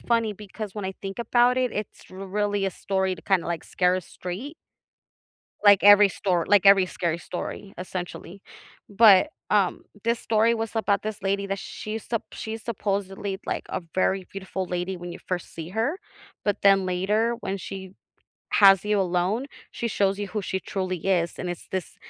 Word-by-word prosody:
funny 230 -2 +1
because 210 0 -8
when 205 -2 -5
I 190 - -3
think 195 +2 -6
about 245 +1 +3
it, 255 -2 0
it's 210 -1 -6
really 200 +1 -2
a - - 0
story 190 0 -1
to - - -14
kinda, 190 -4 +1
like, 170 -1 -3
scare 180 0 +1
us 185 - -6
straight. 210 - -6 1.1
Like, 205 -2 +7
every 205 0 +8
stor 180 -3 0
like, 200 -1 +4
every 195 -1 +7
scary 170 -2 -2
story, 195 +3 -6
essentially. 180 +1 -6 0.5
But, 210 +5 +6 0.2
um, 200 -4 +2 0.2
this 230 0 +1
story 225 +1 +2
was 225 -1 -3
about 205 -3 +1
this 215 -2 -5
lady 200 +1 0
that 195 0 -2
she's 215 0 -6
supp 230 -2 -1
she's 220 0 -6
supposedly, 195 -2 -3
like, - - -2
a - - -3
very 190 0 +1
beautiful 190 -1 -4
lady 180 +1 -3
when 175 0 -7
you - - -9
first 180 -2 -4
see 165 0 -7
her, 225 - -1 0.5
but 205 - +1
then 195 -1 +5
later, 210 +6 +1
when 195 +1 -3
she 190 -1 -7 0.6
has 195 -1 +7
you 210 -1 +1
alone, 185 +7 0 0.2
she 235 - -4
shows 200 -2 +1
you 205 - -3
who 210 -2 -3
she 190 - -2
truly 185 -2 -3
is, 175 -3 +1
and 180 - -4
it's 175 - -8
this 185 -4 -4
195 Hz, 180 wpm, -25 LUFS, 185-210 Hz, 1.1 s, every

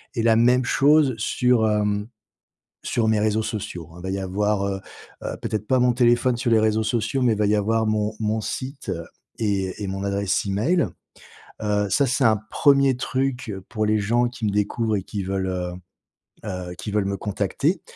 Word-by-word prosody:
et 115 - 0
la 115 -1 +5
même 125 +2 +4
chose 145 0 +4
sur, 120 0 +2
hem, 105 -1 0 0.8
sur 115 -2 0
mes 110 -1 +2
réseaux 110 +1 +1
sociaux, 90 -7 -5
hein. - - -13
Il - - -11
va 95 - -4
y 95 - -2
avoir, 100 +2 0
heu, 95 -1 -3 0.4
heu, - - -3
peut-être 105 -1 -3
pas 130 +2 +3
mon 125 -1 +3
téléphone 120 0 +3
sur 120 0 -1
les 115 -1 +5
réseaux 110 0 +2
sociaux, 115 +3 0
mais 120 -2 +4
il 105 - -2
va 105 - +2
y 105 - +3
avoir 110 +2 +1
mon 110 0 0
mon 110 0 0
site, 135 +2 -4 0.5
et 100 -2 -1
et 100 - -2
mon 95 +1 -4
adresse 100 -1 0
email, 125 - +1 0.7
heu, 105 -1 0
ça, 140 +8 +3
c'est 130 +2 +1
un 110 -1 +5
1er 140 -3 +4
truc, 130 -2 -2 0.2
pour 110 -2 -1
les 105 0 +2
gens 120 +4 +2
qui 120 -2 -6
me 105 - +1
découvrent 105 +2 0
et 95 - -4
qui 100 0 -5
veulent, 95 0 -2
heu, 90 -1 -3 0.7
heu, 90 -1 -5
qui 105 - -5
veulent 105 -1 +1
me 100 - -1
contacter. 110 - -1
110 Hz, 195 wpm, -23 LUFS, 100-120 Hz, 0.8 s, la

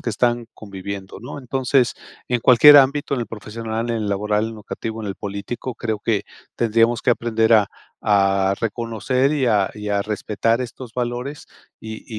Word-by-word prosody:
que - - -4
están 120 +2 0
conviviendo, 100 -1 -8
¿no? 125 +5 -8
Entonces, 130 -1 +1 0.3
en 125 - +1
cualquier 135 +5 +8
ámbito, 140 +1 +4
en 130 - -2
el 120 - -3
profesional, 110 +2 -5
en 115 - 0
el 110 -2 -2
laboral, 105 +2 0
educativo, 110 0 -6
en 105 - -4
el 95 - -5
político, 105 +5 -5
creo 110 -2 -3
que 105 -1 0 0.3
tendríamos 115 +1 +2
que - - +3
aprender 115 -1 +1
a 105 -2 +4 0.3
a 100 -2 +2
reconocer 120 +4 0
y 140 -4 +1
a 105 -4 +2
y 105 0 -6
a 100 -1 +1
respetar 110 +2 -1
estos 125 -1 -7
valores 125 +4 -4 0.3
y 110 0 -8
115 Hz, 165 wpm, -21 LUFS, 105-120 Hz, 0.3 s, cualquier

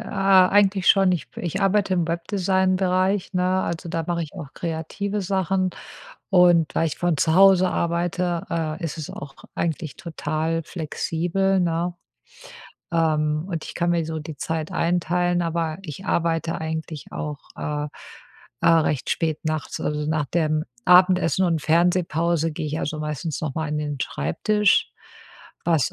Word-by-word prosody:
eigentlich 195 -1 +4
schon. 195 -2 +5
Ich 170 - -3
b - - -9
ich 180 +3 -2
arbeite 195 0 +2
im 175 -3 +1
Webdesign-Bereich, 185 +2 +1
ne? 185 +1 +2
Also, 170 0 -4
da 165 - -1
mache 170 -1 -1
ich 150 - -7
auch 140 -3 -9
kreative 175 +5 -3
Sachen 190 0 0 0.6
und 175 -4 +4
weil 165 - +2
ich 155 - -3
von 175 -4 +1
zu 160 +2 +2
Hause 185 0 +6
arbeite, 170 +1 -1
äh, 165 +1 -2
ist 165 0 -4
es 155 - -6
auch 140 -1 -8 0.2
eigentlich 160 -3 -2
total 160 0 -2
flexibel, 175 +4 -1
ne? 175 0 0 1.0
Ähm, 155 -1 +1
und 165 -4 -4
ich - - -8
kann 175 0 +1
mir 170 -2 +1
so 160 0 -4
die 155 -1 -8
Zeit 160 +4 -3
einteilen, 175 +1 +1
aber 165 -1 -2
ich 180 +3 -8
arbeite 165 -2 0
eigentlich 160 -1 -5
auch, 150 -1 -4 0.2
äh, 150 0 -3 0.8
äh, - - +4
recht 155 -5 +2
spät 160 -2 0
nachts, 155 -1 -3
also 150 0 -2
nach 155 -2 +1
dem 155 -1 0 0.2
Abendessen 180 0 +5
und 165 -3 0
Fernsehpause 170 -1 +2
gehe 150 0 -4
ich 155 +2 -3
also 155 0 -3
meistens 150 +1 -3
nochmal 160 +1 -3
an 150 0 -2
den 145 -2 -3
Schreibtisch, 205 - +1 0.7
was 160 -6 +2
170 Hz, 150 wpm, -23 LUFS, 155-185 Hz, 1.0 s, Hause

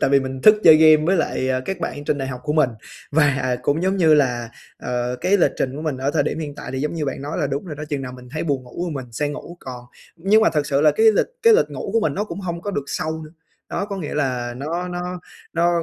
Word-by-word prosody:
tại - - +2
vì 140 -1 +5
mình 130 0 -5
thức 215 - +8
chơi 160 -2 +9
game 155 -1 +6
với 190 - +3
lại 130 -5 0
các 190 -2 -4
bạn 145 -3 -4
trên 145 - 0
đại 135 0 -3
học 125 -1 -6
của 150 - -1
mình. 150 -5 +3 0.4
Và 140 -4 +2
cũng 150 +6 0
giống 190 +1 +1
như 160 -4 +5
là, 125 -5 +1 0.3
ờ, 125 0 -2
cái 195 +2 +3
lịch 185 - +3
trình 130 +1 -2
của 155 - -5
mình 150 -4 -2
ở 135 +2 -1
thời 150 -1 +2
điểm 155 - -2
hiện 150 -3 -5
tại - - -8
thì 130 - -3
giống 150 +4 -2
như 155 -3 -2
bạn 135 - -4
nói 145 +2 -4
là 150 - +1
đúng 140 +4 -3
rồi 155 -6 -7
đó, 150 - -5
chừng 145 -3 -2
nào 125 -1 -6
mình 125 -1 -12
thấy 155 - -3
buồn 140 -5 -1
ngủ 125 +8 -6
thì 160 - -5
mình 125 -4 -7
sẽ 145 +4 -1
ngủ 170 +4 -8
còn 125 -2 -8 0.3
nhưng 200 +6 +3
mà - - +5
thật 150 -2 0
sự 140 -1 +1
là 155 0 +6
cái 220 +10 +2
lịch - - +2 0.2
cái 460 - +7
lịch 485 - +3
ngủ - - -5
của 230 - +3
mình 215 - 0
nó 205 - -1
cũng 205 - -7
hông 170 -3 -4
có 205 - -3
được 140 -7 -3
sâu 160 +2 -3
nữa. 155 - -12 0.4
Đó - - -2
có 200 -1 -5
nghĩa 165 -6 -5
là 125 -4 -1
nó 170 +7 -3
nó 180 0 -5 0.3
nó 170 0 +2
150 Hz, 290 wpm, -21 LUFS, 135-170 Hz, 0.4 s, chơi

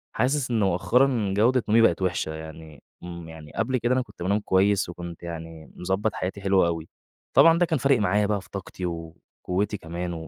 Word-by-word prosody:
حاسس 135 0 0
إن 115 - +1
مؤخَّرًا 105 +3 +2
جودة 120 +3 +3
نومي 115 +2 +5
بقِت 95 -6 +3
وحِشة 90 -4 -1
يعني. 80 -1 -10 0.2
إمم، 85 -2 -8
يعني 80 -2 -11
قبل 130 +3 0
كده 120 +1 +1
أنا 130 - +2
كنت 120 - -9
بانام 100 +3 +1
كويِس 100 -1 +2
وكنت 85 -1 -8
يعني 80 -2 -8
مضبِّط 95 +4 -1
حياتي، 95 +2 -4
حلو 95 -1 +3
أوي، 80 -1 -3 0.4
طبعًا 165 0 +7
ده 175 - +4
كان 160 -3 -1
فارق 135 -1 +3
معايا 105 0 +2
بقى 100 -1 0
في - - -18
طاقتي 95 -1 -6
وقُوَّتي 85 +4 -4
كمان، 85 0 -5
95 Hz, 185 wpm, -25 LUFS, 85-115 Hz, 0.4 s, طبعًا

